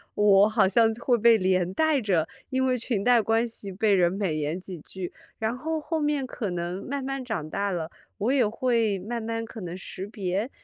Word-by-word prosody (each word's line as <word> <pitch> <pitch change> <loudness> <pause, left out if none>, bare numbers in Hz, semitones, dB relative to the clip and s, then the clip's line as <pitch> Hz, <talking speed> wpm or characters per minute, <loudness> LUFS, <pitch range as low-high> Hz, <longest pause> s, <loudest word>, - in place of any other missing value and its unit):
我 205 0 +5
好 220 -3 +3
像 225 +3 +4
会 240 +1 +1
被 230 +1 +6
连 185 -2 +1
带 315 +3 +2
着， 185 -8 +1 0.2
因 260 0 +1
为 255 -1 +2
裙 230 -4 -1
带 245 +1 +5
关 225 +2 +1
系 210 -3 -7
被 210 +2 +2
人 175 -2 +3
美 195 -5 -1
言 155 +3 -2
几 185 -1 -7
句。 180 +3 -7 0.3
然 220 +2 -1
后 320 +4 -2
后 320 +2 -2
面 295 -2 0
可 225 -5 -4
能 175 +2 -4
慢 280 +1 -3
慢 270 0 -3
长 220 -11 -3
大 200 +4 -1
了， 170 -2 -3 0.3
我 215 +5 0
也 260 -5 +3
会 230 -2 +1
慢 230 +5 -4
慢 225 0 -3
可 225 -1 -9
能 175 0 -5
识 190 +1 -7
别， 200 +1 -2
215 Hz, 225 characters per minute, -26 LUFS, 185-245 Hz, 0.3 s, 被